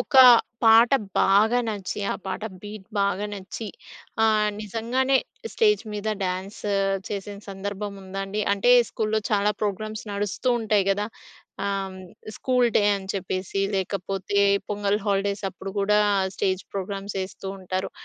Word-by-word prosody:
ఒక 270 - -1 0.5
పాట 225 +1 +7 0.3
బాగా 215 +5 +4
నచ్చి 205 -1 -4
ఆ - - -3
పాట 190 +2 -4 0.2
బీట్ 205 -1 -8
బాగా 200 +1 +1
నచ్చి 200 +3 -7 0.5
ఆహ్, 215 -1 +3
నిజంగానే 235 +5 0 0.4
స్టేజ్ 425 -2 +3
మీద 210 +1 -3 0.2
డ్యాన్స్ 185 +3 -4 0.5
చేసిన 200 0 -5
సందర్భం 200 +1 -5
ఉందా 190 +1 -6
అండి? 205 +2 -3
అంటే 200 +5 +2 0.2
స్కూల్‌లో 220 0 -1
చాలా 205 0 +3
ప్రోగ్రామ్స్ 215 +1 -3
నడుస్తూ 205 +5 -2
ఉంటాయి 210 -3 +2
గదా! 205 +1 0 0.6
ఆహ్, 195 -1 -2 0.4
స్కూల్‌డే 245 -5 +2
అని 190 -1 -9
చెప్పేసి 190 +1 -2
లేకపోతే 195 +1 -2 0.3
పొంగల్ 205 0 0
హాలిడేస్ 200 0 0
అప్పుడు 195 0 -8
కూడా 210 +1 +3 0.4
స్టేజ్ 190 -1 0
ప్రోగ్రామ్స్ 195 +1 -4
ఎస్తూంటారు. 190 -1 -5
200 Hz, 125 wpm, -25 LUFS, 195-215 Hz, 0.6 s, పాట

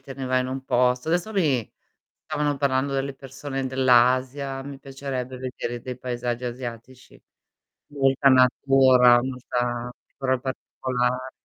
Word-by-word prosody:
te 135 0 -10
ne 135 -1 -6
vai 130 0 +2
in 130 - -3
un 135 0 -5
posto. 125 +2 +1
Adesso 175 +6 0
mi 145 - +1 0.5
stavano 145 -1 -1
parlando 140 0 0
delle 135 0 -1
persone 135 0 -5
dell'Asia, 130 +1 +2
mi 140 -1 -8
piacerebbe 135 -2 -5
vedere 120 -2 -5
dei 125 -1 -6
paesaggi 120 -1 -3
asiatici. 120 0 -8 0.7
Molta 135 -1 +3
natura, 130 -1 +5
molta 125 -1 -3 0.3
però 130 -1 0
particolare. 130 0 -3
130 Hz, 125 wpm, -24 LUFS, 125-135 Hz, 0.7 s, natura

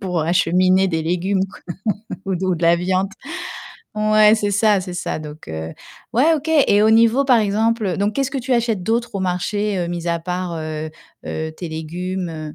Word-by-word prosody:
pour 180 -4 -1
acheminer 185 +3 +3
des 165 -3 -1
légumes, 185 +4 0
quoi - - -15 0.7
ou 195 - 0
d 180 +2 -3
ou 185 - +1
de 170 - -8
la 170 +1 +5
viande. 185 +2 0 0.9
Ouais, 215 0 +5
c'est 205 -2 -1
ça, 205 0 +3
c'est 180 -1 -6
ça 175 - -3
donc 150 0 -10
heu, 80 0 -5 0.5
ouais 295 +8 +4
OK, 305 +1 -6 0.2
et 205 +1 +4
au 220 - +5
niveau 230 +4 +4
par 255 -3 +5
exemple 215 -2 +1
donc 205 +1 0
qu'est-ce 270 +1 0
que 275 - -2
tu 255 +1 -2
achètes 230 -5 +1
d'autre 230 +2 -1
au - - -3
marché, 190 +2 -1
heu, 175 - -1
mis 175 0 -4
à 170 - +1
part, 180 0 -3
heu 155 0 -4 0.4
heu, 160 0 -4
tes 170 +2 -7
légumes, 175 +4 -4
heu, 155 -1 -7
185 Hz, 200 wpm, -20 LUFS, 170-215 Hz, 0.9 s, la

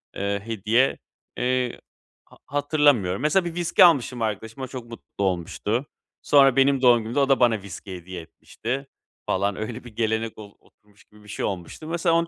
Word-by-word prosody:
eee, 100 0 -2
hediye, 115 +4 +1 0.4
eee, 125 -1 -1 0.4
ha - - -20
hatırlamıyorum. 145 - +2
Mesela 165 +5 +2
bir 170 0 -5
viski 175 +1 +4
almıştım 130 -7 +2
arkadaşıma, 110 +4 -3
çok 125 -2 -8
mutlu 115 -3 -7
olmuştu. 95 - -1 0.4
Sonra 135 -3 +5
benim 135 0 +3
doğum 120 -2 +6
günümde 115 +6 -2
o 140 0 +2
da 135 - +4
bana 115 -4 +3
viski 95 -1 -8
hediye 90 0 -8
etmişti 130 +10 -6 0.4
falan. 100 +1 0
Öyle 110 +3 -5
bir 115 -3 -13
gelenek 110 -1 -1
ol 105 -1 -11
oturmuş 105 0 -26
gibi 105 0 -21
bir - - -17
şey - - -3
olmuştu. 95 - -5
Mesela 170 0 +1
onu 170 0 +2
120 Hz, 170 wpm, -24 LUFS, 105-135 Hz, 0.4 s, doğum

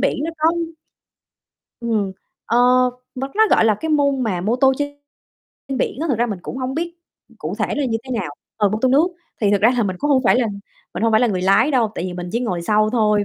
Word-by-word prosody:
biển - - +1
nó 330 - -2
có 315 +1 +4 1.3
Ừm, 215 -5 -1 0.3
ờ, 235 - +2 0.6
m 255 - -6
nó, 440 +1 +5
gọi - - +5
là, 220 - +4
cái 320 - -3
môn 280 -3 +2
mà 190 -6 -1
mô 215 +7 0
tô 265 +1 +4
trên 285 0 -3 0.8
biển - - -1
á, 330 - -1
thực 245 -6 0
ra 240 - +2
mình 205 -5 -4
cũng - - -6
hông 260 0 -3
biết 340 +2 -3 0.4
cụ - - -4
thể - - +1
là 290 - 0
như 225 -3 -1
thế 260 - -10
nào 175 - -4 0.3
ờ, 210 -2 +3
mô 215 - -2
tô 260 - +4
nước. 285 +6 +4 0.3
Thì 205 -2 +3
thực 205 - +2
ra 220 +3 +5
là 240 - +2
mình 190 -3 -2
cũng 295 - -1
hông 265 -2 +4
phải 240 - +5
là 245 - +2 0.5
mình - - -3
hông 230 - +2
phải 220 - +5
là 245 - +4
người 190 -5 -1
lái 195 +9 +4
đâu, 235 -6 +1
tại 170 - -4
vì 185 - -4
mình 175 0 -6
chỉ 235 - 0
ngồi 185 -8 -2
sau 215 +3 +2
thôi, 210 -3 +2
230 Hz, 255 wpm, -20 LUFS, 205-265 Hz, 1.3 s, nó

